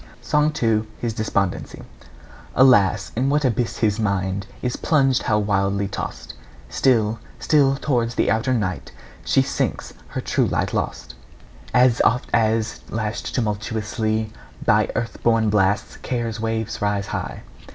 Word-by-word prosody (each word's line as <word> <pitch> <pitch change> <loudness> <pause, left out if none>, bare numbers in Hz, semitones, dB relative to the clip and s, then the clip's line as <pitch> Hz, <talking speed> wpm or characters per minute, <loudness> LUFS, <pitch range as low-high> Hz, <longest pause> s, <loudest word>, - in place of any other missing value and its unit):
SONG 150 +1 +2
II. 110 -1 +2
HIS 115 -2 -3
DESPONDENCY. 100 -3 -2 0.7
Alas! 105 -8 +4
in 130 +4 +1
what 150 0 +2
abyss 120 -1 0
his 110 -1 +1
mind 100 -1 -1 0.2
Is 125 -1 -1
plunged, 135 -5 +2
how 105 - +1
wildly 100 -1 0
tossed! 95 - -6 0.4
Still, 115 -4 +2 0.2
still 140 -3 +3
towards 120 -5 -1
the - - +2
outer 115 +4 +1
night 95 -5 -3 0.3
She - - +3
sinks, - - -2
her - - -5
true - - +1
light - - -1
lost, 60 - -3 0.6
As 125 -2 +4
oft 125 +1 +1
as, 115 -1 +1
lashed 110 0 -3
tumultuously 110 0 -2 0.3
By - - +3
earth 115 - -3
born 115 -2 +3
blasts, 105 +1 +1
care's 115 -3 -3
waves 110 -1 -2
rise 100 -1 0
high. - - -5
110 Hz, 135 wpm, -22 LUFS, 105-120 Hz, 0.7 s, Alas